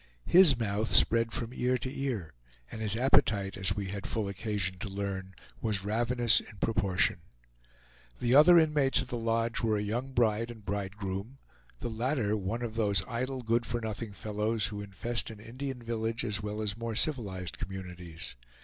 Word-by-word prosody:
His 170 -8 +7
mouth 110 -1 -1
spread 115 0 +5
from 120 +1 -4
ear 125 0 +1
to 130 +1 -5
ear, 115 - -3 0.4
and 110 - -7
his 110 -1 +3
appetite, 110 -5 +2
as 95 +1 +1
we 100 -2 -3
had 100 0 -5
full 110 -3 -2
occasion 100 -2 -2
to 100 - -5
learn, 95 -1 -5 0.3
was 105 -3 -1
ravenous 120 +2 +3
in 105 - -12
proportion. 100 -3 +1 1.0
The 120 0 +1
other 160 +5 +8
inmates 150 -4 +4
of - - -12
the 120 - -3
lodge 115 0 0
were 110 -2 +1
a 105 - -1
young 120 +6 -3
bride 115 -1 +1
and 110 -4 -11
bridegroom; 100 +4 -4 0.4
the 120 - -3
latter 115 -2 0
one 110 +4 -3
of 115 -2 -4
those 100 -6 +2
idle, 130 +2 -3
good 115 +1 +1
for 120 - -1
nothing 110 -1 -5
fellows 105 +2 -1
who 105 -3 -4
infest 100 +4 -1
an 110 -2 -10
Indian 125 +3 -6
village 115 0 -2
as 105 -2 -1
well 105 +1 -4
as 100 -2 -2
more 115 0 -4
civilized 100 - -1
communities. 90 -6 -7
110 Hz, 175 wpm, -30 LUFS, 100-120 Hz, 1.0 s, other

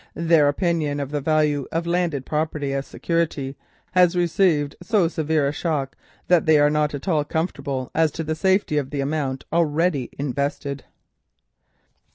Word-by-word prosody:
Their 165 -2 +4
opinion 150 -1 0
of 140 -1 -4
the 145 -1 -2
value 150 -2 +1
of 165 +1 -1
landed 170 -6 -1
property 150 -2 -2
as 135 0 -3
security 155 -5 -2 0.4
has 180 -1 +4
received 170 -4 +2
so 190 -1 +2
severe 160 -3 0
a - - 0
shock, 150 -4 -2 0.3
that 175 -2 +3
they 155 -1 +6
are 145 0 +4
not 150 -1 +1
at 140 - -8
all 155 -5 +2
comfortable 140 -5 -3
as 160 -1 +3
to 165 - -4
the 155 0 -2
safety 190 -3 +1
of 135 -2 -5
the 140 -1 -2
amount 135 -2 -2
already 165 -4 +1
invested." 140 0 -3
150 Hz, 160 wpm, -23 LUFS, 140-170 Hz, 0.4 s, they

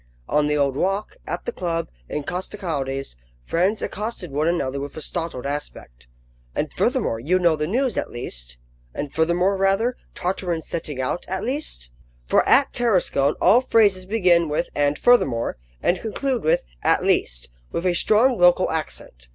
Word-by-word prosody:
On 150 0 +2
the 150 0 +1
Old 140 -2 +1
Walk, 195 - -1
at - - -4
the 480 - -2
club, 165 - -2 0.2
in 150 - -3
Costecalde's, 145 - -4 0.3
friends 185 - 0
accosted 210 -5 -4
one 150 +3 0
another 140 -6 0
with 140 +2 -6
a - - -5
startled 165 -7 -3
aspect: 100 - -6 0.5
"And - - -2
furthermore, 115 - 0
you 165 +10 +2
know 170 -3 +3
the 150 0 -2
news, 250 - 0
at - - -4
least?" - - -5 0.4
"And 145 - -4
furthermore, 175 +4 +2
rather? 195 +6 +1 0.2
Tartarin's 175 -3 -2
setting 150 -5 -4
out, 130 +6 -1
at 190 +1 -3
least?" 245 - -3 0.3
For - - +3
at 275 - +5
Tarascon 185 - +2
all 210 +8 +6
phrases 205 -7 +3
begin 180 -6 +3
with 155 +4 -1
"and 145 0 +1
furthermore," 135 - +3 0.3
and 175 +1 +1
conclude 250 +2 -2
with 155 - +2 0.2
"at - - +2
least," - - 0 0.2
with 170 - -3
a 180 - +3
strong 220 +6 +3
local 175 +1 +5
accent. 65 - -5
170 Hz, 160 wpm, -23 LUFS, 145-195 Hz, 0.5 s, all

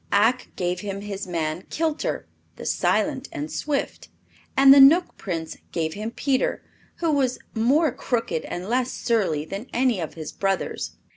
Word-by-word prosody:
Ak 230 +5 +3
gave 180 -1 -1
him 200 -1 -5
his 200 -2 -5
man 165 -1 -2
Kilter, 315 -1 -1 0.3
"the - - -9
silent - - 0
and 300 +1 -5
swift." 295 -2 -3 0.5
And 270 0 +9
the 280 - +8
Knook 325 +7 +6
Prince 165 -5 -4
gave 160 -2 -1
him 215 +2 -4
Peter, 260 +2 0 0.3
who 335 -2 0
was 265 -4 +1 0.2
more 270 +7 +3
crooked 225 -10 -2
and 180 +2 -5
less 250 +2 +1
surly 190 -11 0
than 195 +8 -6
any 245 -4 +2
of 160 - -5
his 155 -2 -6
brothers. 195 -1 -2
225 Hz, 155 wpm, -24 LUFS, 180-270 Hz, 0.5 s, And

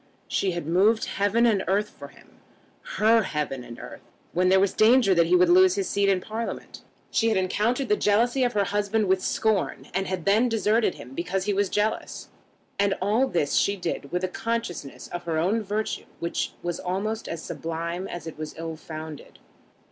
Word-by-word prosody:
She 190 -2 0
had 170 -3 -4
moved 195 +7 +3
heaven 205 +4 +1
and 210 -5 +2
earth 205 +2 +1
for 140 - -11
him, 140 - -21 0.6
her 225 +2 +5
heaven 150 - -3
and 120 -1 -10
earth, - - -10 0.3
when 180 +1 +2
there 190 +1 +5
was 195 0 +2
danger 225 -2 +5
that 170 -2 +3
he 180 - +4
would 180 0 +5
lose 185 +1 +6
his 195 -2 -1
seat 200 0 +1
in 190 -2 +3
Parliament. 225 +3 -6 0.3
She 230 - +2
had 220 - +1
encountered 215 +8 0
the 210 - +3
jealousy 235 +6 +2
of 245 - +1
her 205 -1 +2
husband 205 +2 0
with 190 0 +2
scorn, 215 -1 -1
and 195 +1 -1
had 185 -3 -3
then 220 +5 +4
deserted 225 -2 +1
him 125 +3 -11
because 180 +5 -2
he 205 +1 0
was 200 -1 +1
jealous. 210 +1 -2 0.5
And 200 -1 +2
all 215 +8 +2
this 160 - 0
she 200 - +2
did 170 -6 -4
with 180 +1 -1
a - - +2
consciousness 185 -8 -4
of 175 0 -6
her 165 -2 -1
own 190 +8 +1
virtue 210 +1 -3
which 170 - -2
was 175 -1 -3
almost 210 +5 -3
as 165 -1 -5
sublime 170 +3 -4
as 175 -4 -7
it 160 -1 -8
was 155 -1 -6
ill 165 -1 -5
founded. 155 -1 -9
195 Hz, 195 wpm, -25 LUFS, 175-215 Hz, 0.6 s, lose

